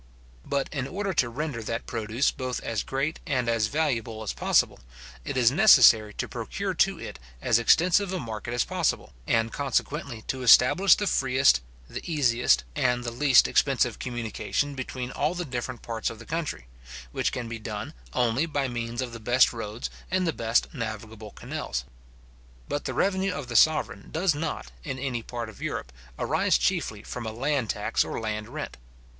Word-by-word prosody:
But 140 -1 0
in 135 -2 -2
order 195 +4 -3
to 130 -7 +2
render 135 -1 -4
that 115 +2 -4
produce 115 +3 0
both 130 -2 -4
as 115 -2 -2
great 140 +4 -2
and 130 -6 0
as 115 -2 +2
valuable 120 -6 -1
as 105 - -3
possible, - - +2 0.4
it 130 - -4
is 120 -2 +5
necessary 125 - +7
to - - -3
procure - - -4
to - - +2
it - - -8 0.2
as 110 - +3
extensive 180 - +4
a 185 - -2
market 115 -2 -5
as 120 - +2
possible, - - -1
and 115 -1 +1
consequently 140 -3 -2
to 130 - -4
establish 125 - +7
the 205 - -2
freest, 135 - +3 0.3
the - - -6
easiest, 125 -6 +3
and 125 -4 +1
the 120 - -3
least 130 +1 +5
expensive 125 -5 +2
communication 120 +4 -2
between 130 -1 -5
all 150 +6 -1
the 175 0 -3
different 125 -2 -5
parts 115 -1 -2
of 115 - -8
the 115 - -12
country; 160 - -3 0.5
which - - 0
can 120 -2 -4
be 115 0 -6
done 105 -1 -6 0.2
only 125 - +1
by 145 -3 -1
means 120 0 -3
of 120 -2 -7
the 115 - -7
best 120 +4 +4
roads 115 0 -5 0.2
and 185 0 +1
the 165 - 0
best 115 -1 +1
navigable 110 -3 -6
canals. - - -5 0.8
But 145 - -3
the - - -3
revenue 190 -1 +1
of 140 -7 -6
the 120 - -5
sovereign 155 +8 +3
does 175 +1 +1
not, 155 +2 -4
in 135 -3 -4
any 130 -3 -2
part 120 0 -5
of 110 - -12
Europe, - - -4 0.3
arise - - +2
chiefly - - -1
from 120 -2 -6
a - - -3
land 130 0 -1
tax - - +1
or - - -4
land 105 -1 -4
rent. - - -6
125 Hz, 180 wpm, -27 LUFS, 115-145 Hz, 0.8 s, necessary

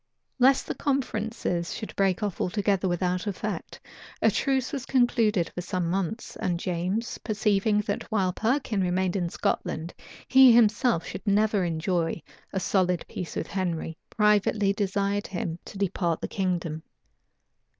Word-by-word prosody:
Lest 265 +2 +5
the - - -3
conferences 220 -9 -2
should 215 - -7
break 195 +1 +1
off 205 -4 -2
altogether 195 0 +1
without 180 +2 -1
effect, 200 - -4 0.4
a - - +4
truce 265 -2 0
was 275 -3 -3
concluded 230 -7 +2
for 180 - -4
some 180 -1 -2
months; 195 +4 -3
and 175 -2 -1
James, 185 +6 -2
perceiving 210 -1 +1
that 205 +2 -4
while 190 -4 +1
Perkin 225 -2 0
remained 185 0 0
in 175 -3 0
Scotland 165 0 -2 0.3
he 265 -1 +8
himself 225 -4 +4 0.2
never 210 +1 +3
should - - 0
enjoy 165 +1 -1 0.3
a 190 - -1
solid 180 -2 +1
peace 180 - -6
with - - -2
Henry, 170 -4 -3
privately 210 -1 +3
desired 200 0 -1
him 175 -3 -4
to - - -9
depart 180 -4 0
the - - -2
kingdom. 175 -5 -2
195 Hz, 140 wpm, -27 LUFS, 180-215 Hz, 0.4 s, he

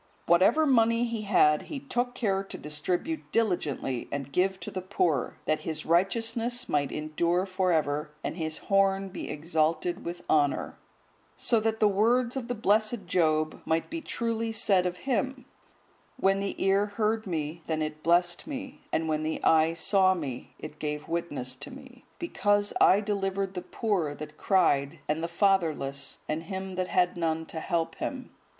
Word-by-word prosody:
Whatsoever 185 - +5
money 230 -3 +4
he 230 -2 -3
had, 155 -7 +4
he 295 - -4
took 245 -2 -2
care 195 -4 0
to 195 - -8
distribute 175 - -3
diligently 155 - -1
and 140 -1 -4
give 190 +5 +1
to - - -6
the 185 - -4
poor, 175 -7 0
that 155 - +1
his 160 -1 -4
righteousness 230 +7 +1
might 145 -2 0
endure 170 +4 0
for 185 -1 0
ever, 150 -1 0
and - - -3
his 160 -2 -3
horn 195 -1 +2
be 185 - -6
exalted 160 +2 -1
with 175 +1 -6
honour; 145 -2 +1 0.6
so 230 - +2
that 220 0 -1
the 215 - +5
words 235 +5 +2
of 255 -3 -3
the 245 - -2
blessed 215 0 +1
Job 155 -3 +1
might 160 0 -1
be 330 0 -3
truly 230 -5 -2
said 195 -4 +3
of 180 0 -4
him,(155) 265 +1 -1 0.7
"When 195 -5 +2
the 200 0 -2
ear 195 +2 +2
heard 215 +1 -1
me, 160 -1 -3
then 155 -1 0
it 155 0 -5
blessed 175 - +2
me; 275 -2 -6
and 160 0 0
when 155 -1 0
the 155 +1 -2
eye 160 +1 +4
saw 190 +2 +3
me, 135 -8 -6
it 150 -1 -9
gave 150 0 -3
witness 165 -7 -2
to 145 - -8
me: 260 -1 -13
because 205 -11 +1
I 195 +3 +6
delivered 195 -2 -1
the 180 - -4
poor 180 -6 -1
that 150 0 -8
cried, 165 -6 +2
and 155 +2 -1
the - - 0
fatherless, 165 -7 0
and 155 +1 -2
him 190 0 -5
that 185 0 -2
had 180 -1 +1
none 160 -1 -1
to 160 - -6
help 165 -1 -1
him. 260 -2 -5
185 Hz, 170 wpm, -28 LUFS, 155-215 Hz, 0.7 s, I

